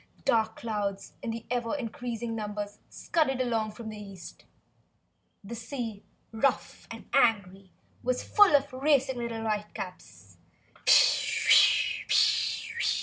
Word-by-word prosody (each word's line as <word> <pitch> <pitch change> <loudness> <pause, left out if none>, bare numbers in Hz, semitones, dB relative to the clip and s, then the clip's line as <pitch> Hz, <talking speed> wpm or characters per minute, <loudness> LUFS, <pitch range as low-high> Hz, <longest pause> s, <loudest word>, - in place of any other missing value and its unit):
Dark 220 -1 +1
clouds 205 -3 -4
in 230 0 -5
ever 240 +2 -1
increasing 235 -2 -5
numbers 210 -1 -5
scudded 285 -6 -1
along 230 -4 0
from 220 0 -8
the 215 -1 -8
east; 195 -3 -11 1.0
the 205 +4 -8
sea, 230 -3 -6 0.3
rough 230 +5 -1
and - - -10
angry, 195 -4 +1 0.3
was 250 0 -1
full 410 -7 +5
of 280 -1 +1
racing 265 -2 +1
little 230 -1 -4
whitecaps. 185 - -6
225 Hz, 100 wpm, -28 LUFS, 205-245 Hz, 1.0 s, full